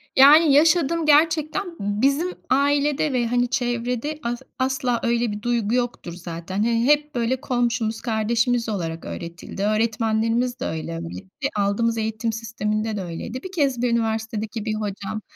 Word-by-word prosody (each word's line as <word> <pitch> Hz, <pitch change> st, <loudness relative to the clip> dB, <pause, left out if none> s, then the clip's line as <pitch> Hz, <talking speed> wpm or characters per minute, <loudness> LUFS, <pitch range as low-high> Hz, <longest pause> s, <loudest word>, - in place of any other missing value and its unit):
Yani, 290 Hz, +3 st, +8 dB
yaşadım 325 Hz, +2 st, +4 dB
gerçekten 315 Hz, +4 st, +3 dB
b 205 Hz, +1 st, -2 dB
bizim 290 Hz, +7 st, +2 dB, 0.2 s
ailede 285 Hz, +2 st, +2 dB
ve 240 Hz, -2 st, +1 dB
hani 245 Hz, +1 st, +1 dB
çevrede 245 Hz, +4 st, -2 dB
as 240 Hz, +1 st, -3 dB, 0.2 s
asla 260 Hz, -2 st, 0 dB
öyle 235 Hz, -1 st, +1 dB
bir 210 Hz, 0 st, -5 dB
duygu 235 Hz, -2 st, 0 dB
yoktur 245 Hz, -8 st, -2 dB
zaten. 170 Hz, +1 st, -7 dB
Hani, 230 Hz, 0 st, +1 dB
hep 295 Hz, +1 st, +2 dB
böyle 245 Hz, +2 st, 0 dB
komşumuz, 235 Hz, -3 st, -1 dB
kardeşimiz 230 Hz, +1 st, 0 dB
olarak 165 Hz, -5 st, -3 dB
öğretildi. 170 Hz, +3 st, -6 dB
Öğretmenlerimiz 225 Hz, +3 st, +1 dB
de 265 Hz, -, -3 dB
öyle, 160 Hz, +1 st, -4 dB
hani, 165 Hz, 0 st, -6 dB, 0.3 s
ve -, -, +3 dB
aldığımız 210 Hz, +3 st, +1 dB
eğitim 220 Hz, +1 st, -2 dB
sisteminde 215 Hz, -1 st, -2 dB
de 195 Hz, -, -3 dB
öyleydi. 185 Hz, +9 st, -6 dB
1 375 Hz, -, -7 dB
kez, 280 Hz, -9 st, 0 dB
bir 245 Hz, -1 st, +1 dB
üniversitedeki 220 Hz, -1 st, -2 dB
bir 215 Hz, -1 st, -1 dB
hocam 205 Hz, 0 st, -4 dB
235 Hz, 150 wpm, -23 LUFS, 215-265 Hz, 0.3 s, Yani